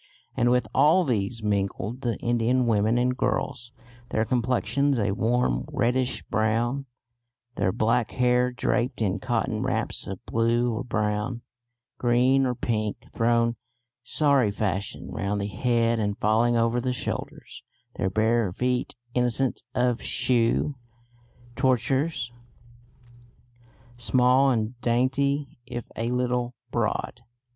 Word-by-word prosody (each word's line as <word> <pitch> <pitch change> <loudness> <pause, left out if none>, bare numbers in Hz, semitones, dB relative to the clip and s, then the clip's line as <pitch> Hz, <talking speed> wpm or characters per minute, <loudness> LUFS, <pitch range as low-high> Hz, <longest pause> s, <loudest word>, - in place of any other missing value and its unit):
And 120 - +2
with 125 -2 +2
all 155 +7 +5
these 115 - -2
mingled 105 +3 -1
the 120 -3 -1
Indian 120 +2 +1
women 110 0 +2
and 125 +1 +1
girls, 125 -1 -2 0.4
their 110 - 0
complexions 130 +3 +1
a 100 -3 +1
warm 110 - +1
reddish 125 +1 0
brown, 120 +5 0 0.7
their 95 - 0
black 115 +3 +1
hair 125 0 +2
draped 125 +1 -1
in 105 -2 0
cotton - - -1
wraps - - -2
of 95 -1 -7
blue 115 +1 +1
or 110 +3 -3
brown, 110 +1 -2 0.6
green 130 +2 +3
or 125 - -1
pink, 110 -3 -3
thrown 115 0 +2 0.4
sari 140 -7 +2
fashion 100 -1 -3
round 100 +1 -2
the 100 - -2
head 115 +3 +1
and 105 -1 -1
falling 115 +3 +2
over 115 +1 +1
the 125 0 -1
shoulders; - - -6 0.4
their 95 - 0
bare 110 0 +1
feet, 125 +5 -1 0.2
innocent 125 +1 0
of 125 -1 +1
shoe 125 +3 +1 0.8
tortures, 130 +1 0 1.6
small 125 +3 +3
and 120 0 -1
dainty, 135 +3 0
if 120 -2 -5
a 115 - -2
little 125 0 -1 0.2
broad. - - -2
120 Hz, 120 wpm, -26 LUFS, 110-125 Hz, 1.6 s, all